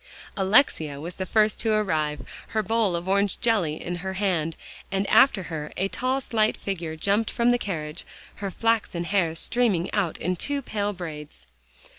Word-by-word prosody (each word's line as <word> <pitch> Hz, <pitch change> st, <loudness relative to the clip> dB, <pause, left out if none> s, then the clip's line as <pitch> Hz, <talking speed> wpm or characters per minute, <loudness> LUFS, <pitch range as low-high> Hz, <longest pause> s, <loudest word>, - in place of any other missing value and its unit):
Alexia 190 Hz, -, +3 dB
was 170 Hz, +4 st, -7 dB
the 190 Hz, -, -3 dB
first 215 Hz, +2 st, +3 dB
to 225 Hz, -, +1 dB
arrive, 155 Hz, -10 st, 0 dB, 0.2 s
her 215 Hz, -1 st, -1 dB
bowl 220 Hz, -5 st, +1 dB
of 170 Hz, +2 st, -4 dB
orange 200 Hz, +1 st, +2 dB
jelly 200 Hz, -10 st, +1 dB
in 175 Hz, 0 st, -4 dB
her 190 Hz, +2 st, -4 dB
hand, 180 Hz, -5 st, 0 dB, 0.3 s
and 195 Hz, +1 st, 0 dB
after 215 Hz, -8 st, +6 dB
her, 155 Hz, -3 st, -5 dB
a 195 Hz, +2 st, 0 dB
tall 255 Hz, +5 st, 0 dB
slight 220 Hz, -4 st, +1 dB
figure 170 Hz, -5 st, -4 dB
jumped 200 Hz, +7 st, +1 dB
from 240 Hz, 0 st, +2 dB
the 245 Hz, -, +2 dB
carriage, 155 Hz, -5 st, -3 dB, 0.3 s
her 200 Hz, -1 st, -3 dB
flaxen 220 Hz, -4 st, 0 dB
hair 170 Hz, -3 st, +1 dB
streaming 195 Hz, -2 st, 0 dB
out 195 Hz, -6 st, 0 dB
in 180 Hz, +2 st, -1 dB
two 280 Hz, -, -2 dB
pale 205 Hz, -3 st, -1 dB
braids. 150 Hz, -, -8 dB
190 Hz, 170 wpm, -25 LUFS, 165-215 Hz, 0.3 s, after